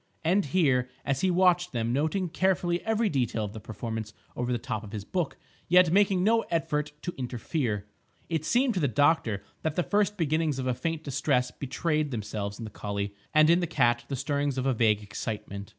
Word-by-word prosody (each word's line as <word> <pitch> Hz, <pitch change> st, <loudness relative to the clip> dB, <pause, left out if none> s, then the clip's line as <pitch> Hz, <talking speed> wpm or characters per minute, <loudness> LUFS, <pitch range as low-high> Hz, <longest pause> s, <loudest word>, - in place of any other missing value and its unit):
And, 185 Hz, +5 st, +3 dB
here, 135 Hz, -6 st, +2 dB, 0.2 s
as 135 Hz, -1 st, 0 dB
he 190 Hz, -, +3 dB
watched 180 Hz, -1 st, +3 dB
them, 115 Hz, 0 st, 0 dB
noting 160 Hz, +7 st, 0 dB
carefully 175 Hz, 0 st, +1 dB
every 220 Hz, 0 st, +2 dB
detail 120 Hz, -, 0 dB
of 100 Hz, -, -7 dB
the 110 Hz, -, -7 dB
performance 110 Hz, +1 st, -5 dB, 0.2 s
over 125 Hz, 0 st, -2 dB
the 120 Hz, -, +1 dB
top 115 Hz, -3 st, -4 dB
of 105 Hz, 0 st, -10 dB
his 105 Hz, -2 st, -5 dB
book, 175 Hz, -, -2 dB, 0.3 s
yet 180 Hz, -1 st, +6 dB
making 195 Hz, -2 st, +4 dB
no 225 Hz, +3 st, +4 dB
effort 150 Hz, -3 st, -1 dB
to 175 Hz, -, -3 dB
interfere, 120 Hz, -3 st, -2 dB, 0.4 s
it 160 Hz, -2 st, -1 dB
seemed 245 Hz, -, +2 dB
to 190 Hz, -, -1 dB
the 145 Hz, -, +2 dB
doctor 125 Hz, -5 st, +2 dB, 0.2 s
that 160 Hz, -1 st, -2 dB
the 180 Hz, -, +1 dB
first 205 Hz, +1 st, +1 dB
beginnings 155 Hz, -2 st, +1 dB
of 130 Hz, -, -3 dB
a 130 Hz, -, +1 dB
faint 165 Hz, +4 st, -3 dB
distress 135 Hz, -3 st, 0 dB
betrayed 150 Hz, +2 st, -1 dB
themselves 105 Hz, -4 st, -4 dB
in 120 Hz, -, -7 dB
the 110 Hz, -, -8 dB
collie, 100 Hz, -1 st, -4 dB, 0.2 s
and 155 Hz, 0 st, +6 dB
in 170 Hz, -, +5 dB
the 175 Hz, -, -1 dB
cat 120 Hz, -5 st, +2 dB
the 140 Hz, -, -3 dB
stirrings 140 Hz, +1 st, -1 dB
of 130 Hz, -, -1 dB
a 135 Hz, -, +3 dB
vague 110 Hz, -3 st, +2 dB
excitement. 105 Hz, -1 st, -5 dB
140 Hz, 200 wpm, -28 LUFS, 115-175 Hz, 0.4 s, yet